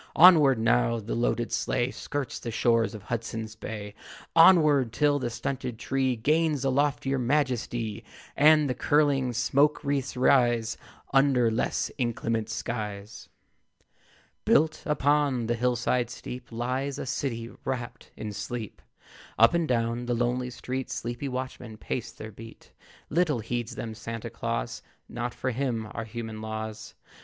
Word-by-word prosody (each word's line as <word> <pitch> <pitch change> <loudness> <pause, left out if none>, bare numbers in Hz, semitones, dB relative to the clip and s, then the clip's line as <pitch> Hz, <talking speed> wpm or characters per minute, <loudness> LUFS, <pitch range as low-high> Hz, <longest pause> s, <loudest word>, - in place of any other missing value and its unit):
Onward! 155 -7 +8
Now 115 +1 +2
the 110 +1 -5
loaded 120 0 0
sleigh 120 +2 0
Skirts 145 -3 -4
the 120 - -5
shores 115 0 +2
of 105 - -9
Hudson's 110 0 -4
Bay. 105 -2 -7 0.4
Onward, 155 -8 +6
till 145 +3 +2
the 125 -3 -2
stunted 125 0 -4
tree 130 +1 0
Gains 150 +3 +1
a 135 - +2
loftier 135 -1 +1
majesty, 120 -4 -1 0.3
And 150 0 +6
the 130 - 0
curling 140 -3 +2
smoke 140 +6 +2
wreaths 140 -2 -1
rise 120 -3 +3 0.4
Under 135 -4 +4
less 110 - -1
inclement 115 -2 -1
skies. 105 -3 -5 1.1
Built 155 +1 +3
upon 145 -5 +2
a 120 - +1
hill 125 +1 +1
side 120 +1 0
steep 125 0 -8
Lies 130 +4 -2
a - - -4
city 120 -3 -3
wrapt 125 -3 -5
in 105 -1 -5
sleep. 110 +1 -6 0.6
Up 115 +1 +6
and 170 -2 +1
down 120 -1 0
the 120 - +1
lonely 125 +1 0
street 130 +2 -5
Sleepy 120 +4 -4
watchmen 125 -3 -5
pace 120 +2 -4
their 110 - -9
beat. 115 +2 -13 0.4
Little 155 -6 +2
heeds 120 +1 -3
them 115 -2 -5
Santa 115 +1 -6
Claus; - - -3 0.3
Not 120 0 -4
for 130 - -2
him 120 -3 -2
are 115 - -5
human 110 -1 -6
laws. 110 0 -6
120 Hz, 140 wpm, -27 LUFS, 115-135 Hz, 1.1 s, Onward